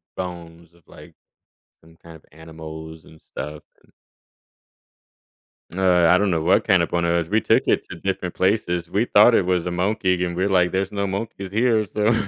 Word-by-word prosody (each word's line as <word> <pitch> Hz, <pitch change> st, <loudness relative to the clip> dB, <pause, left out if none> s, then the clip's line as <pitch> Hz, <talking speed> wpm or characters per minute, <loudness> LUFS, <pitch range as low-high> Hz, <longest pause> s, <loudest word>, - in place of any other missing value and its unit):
bones 85 Hz, -2 st, -8 dB
of, 85 Hz, -, -26 dB
like, -, -, -15 dB, 0.7 s
some 80 Hz, 0 st, -21 dB
kind 85 Hz, 0 st, -14 dB
of 80 Hz, -, -18 dB
animals 80 Hz, 0 st, -11 dB
and 80 Hz, -, -18 dB
stuff 75 Hz, 0 st, -8 dB, 0.2 s
and -, -, -28 dB, 1.8 s
Uh, 90 Hz, -2 st, +3 dB
I 90 Hz, -, +5 dB
don't 105 Hz, 0 st, +1 dB
know 85 Hz, -3 st, 0 dB
what -, -, +2 dB
kind -, -, +4 dB
of -, -, -3 dB
bone 85 Hz, -1 st, -1 dB
it 85 Hz, 0 st, +1 dB
was. 85 Hz, -2 st, -2 dB
We 110 Hz, +1 st, +2 dB
took 110 Hz, -, +2 dB
it -, -, +1 dB
to -, -, -7 dB
different 90 Hz, 0 st, -4 dB
places. 90 Hz, -3 st, 0 dB
We 105 Hz, +4 st, 0 dB
thought 110 Hz, +1 st, +5 dB
it 100 Hz, -, +3 dB
was 90 Hz, -2 st, 0 dB
a 90 Hz, -, -3 dB
monkey, 90 Hz, 0 st, 0 dB
and 85 Hz, -1 st, -3 dB
we're 95 Hz, +3 st, 0 dB
like, 90 Hz, -2 st, +2 dB
"There's 95 Hz, 0 st, -2 dB
no 100 Hz, -1 st, -2 dB
monkeys 100 Hz, -1 st, -5 dB
here," 110 Hz, 0 st, +1 dB
so. 105 Hz, +4 st, +1 dB
90 Hz, 195 wpm, -22 LUFS, 85-100 Hz, 1.8 s, I